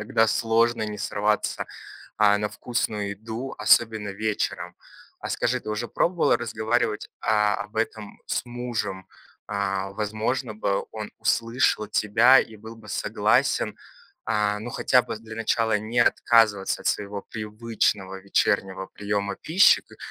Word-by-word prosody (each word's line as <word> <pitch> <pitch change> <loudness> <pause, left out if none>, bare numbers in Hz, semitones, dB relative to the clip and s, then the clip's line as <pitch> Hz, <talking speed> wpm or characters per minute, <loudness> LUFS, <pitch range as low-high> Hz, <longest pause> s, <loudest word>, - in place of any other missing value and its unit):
иногда 110 0 +2
сложно 115 +1 +2
не 105 -1 -4
сорваться, 105 +1 -1 0.5
а, 105 -1 +4
на 105 0 -1
вкусную 105 -3 -2
еду, 110 +6 -6
особенно 110 -3 +3
вечером. 105 +1 -3 0.4
А - - -6
скажи, - - 0
ты - - -10
уже 110 +2 -3
пробовала 175 -1 +2
разговаривать, 115 -1 -1
а, 105 -2 +2
об 105 - -16
этом 110 -1 -3
с - - -1
мужем? 115 -6 -4 0.4
А, 100 -1 -2
возможно 110 +4 -2
бы, 100 -2 -1
он 110 -1 -6
услышал 115 -2 +1
тебя 115 +5 +5
и 110 - -1
был 110 +2 -11
бы 110 -2 -15
согласен. - - +1 0.5
А, 105 -1 +1
ну 120 +3 -6
хотя 125 +1 +3
бы - - -6
для 110 0 -10
начала 115 -1 +1
не 110 +3 -3
отказываться 110 -4 +3
от - - -8
своего 100 0 -1
привычного 105 -3 -2
вечернего 95 -1 0
приема 100 -1 -3
пищи, 180 +6 +5
ко - - -18
110 Hz, 135 wpm, -25 LUFS, 105-115 Hz, 0.5 s, тебя